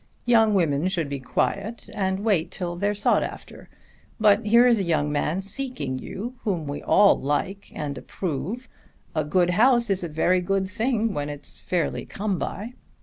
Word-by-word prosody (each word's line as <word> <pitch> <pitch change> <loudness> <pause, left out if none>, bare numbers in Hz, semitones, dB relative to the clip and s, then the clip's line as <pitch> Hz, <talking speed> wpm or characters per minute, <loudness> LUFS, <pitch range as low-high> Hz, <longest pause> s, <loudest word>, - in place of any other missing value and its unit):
Young 225 -3 +4
women 160 -3 +2
should 170 -6 -1
be 140 -1 -3
quiet 200 - -2
and 190 -1 -1
wait 200 -7 +1
till 175 -2 -4
they're 205 +4 0
sought 205 - +2
after. - - -8 0.5
But 210 0 +5
here 235 +3 +6
is 235 -3 +4
a - - +1
young 155 -4 +1
man 155 +5 -1
seeking 195 - -4
you 230 - -6
whom 180 -8 -2
we 145 0 -5
all 200 0 +5
like 165 +8 -2
and 145 -2 -3
approve. 185 - -4 0.5
A 155 - 0
good 175 +4 +2
house 235 +3 +4
is 190 -1 0
a 170 - -3
very 180 +4 +2
good 195 +1 0
thing 225 +2 0
when 145 -2 -3
it's 145 -1 -8
fairly 175 -2 -1
come 200 -2 -2
by." 215 +7 -4
190 Hz, 175 wpm, -25 LUFS, 155-215 Hz, 0.5 s, here